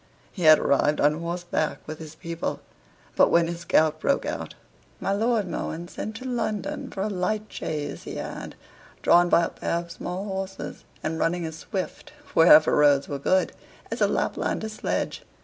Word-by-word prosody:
He 185 - -8
had 155 0 +9
arrived 145 +2 +2
on 150 +2 +3
horseback 170 -2 -2
with 155 0 -6
his 155 -1 -9
people; 165 +1 -4 0.6
but - - +5
when 170 0 +4
his 170 0 -5
gout 155 0 +3
broke 280 - +1
out - - -4 0.4
my 195 - 0
Lord 220 -1 +1
Mohun 170 0 -4
sent 220 - -6
to 255 - -8
London 255 +3 -2
for 190 - -3
a - - 0
light 210 +2 -1
chaise 150 -2 -4
he - - -7
had, - - -6 0.5
drawn 175 0 +5
by 170 - +5
a - - 0
pair 170 - -2
of 170 0 -5
small 180 +3 -5
horses, 190 -1 -5 0.2
and 160 +1 -2
running 175 0 0
as 160 0 -6
swift, 195 +6 -5 0.2
wherever 155 -1 +7
roads 145 -2 +4
were 140 - -4
good, 185 +6 +2 0.4
as - - -4
a - - +5
Laplander's 220 0 -1
sledge. - - -2
175 Hz, 175 wpm, -25 LUFS, 155-200 Hz, 0.6 s, had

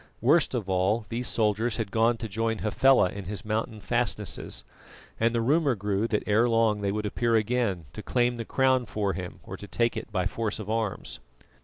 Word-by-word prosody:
Worst 145 +4 +3
of 110 -6 -2
all, 95 +4 +1
these 120 +2 -2
soldiers 110 +1 +1
had 110 -4 -3
gone 115 +1 +3
to 115 - -5
join 110 +2 -1
Hafela 110 0 +4
in 100 0 -7
his 100 +3 -6
mountain 110 +1 -2
fastnesses; 105 0 -1 0.6
and 115 +1 +3
the 115 0 0
rumour 140 +2 +2
grew 100 +1 -1
that 105 -2 0
ere 110 +3 +3
long 115 -2 +2
they 100 -1 0
would 105 +1 -2
appear 115 +3 +1
again, 110 -6 0
to 105 - -6
claim 120 +1 +1
the 115 - -3
crown 130 0 +2
for 100 -3 -1
him 90 -2 -6
or - - -8
to 105 - -10
take 115 +3 0
it - - -6
by 95 -3 0
force 110 +1 -2
of 110 -1 -5
arms. 110 - -2
110 Hz, 200 wpm, -27 LUFS, 105-120 Hz, 0.6 s, Hafela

